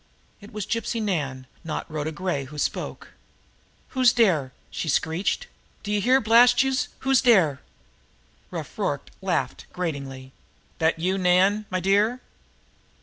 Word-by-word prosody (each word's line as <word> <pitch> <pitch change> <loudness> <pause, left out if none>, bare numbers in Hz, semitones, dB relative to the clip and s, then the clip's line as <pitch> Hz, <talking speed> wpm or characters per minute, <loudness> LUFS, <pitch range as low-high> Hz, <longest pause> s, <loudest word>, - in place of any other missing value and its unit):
It 205 +1 -13
was 210 -2 -4
Gypsy 230 0 -2
Nan, 145 -11 -2 0.2
not 160 - -4
Rhoda 155 0 -3
Gray, 155 -4 -2
who 150 +3 -11
spoke. - - -3 0.8
"Who's 255 -2 +4
dere?" 170 - +2 0.2
she 165 - -3
screeched. 165 - 0 0.4
"D'ye 210 0 0
hear, 255 +6 +4
blast 245 +2 +5
youse, 265 -1 0
who's 265 -1 +3
dere?" 180 - +4 0.9
Rough - - -7
Rorke - - -2
laughed - - -2
gratingly. 140 -6 -5 0.5
"That 160 0 +2
you, 185 +4 0
Nan, 190 +4 +3
my 185 - -1
dear?" 205 +6 +2
185 Hz, 130 wpm, -25 LUFS, 155-225 Hz, 0.9 s, blast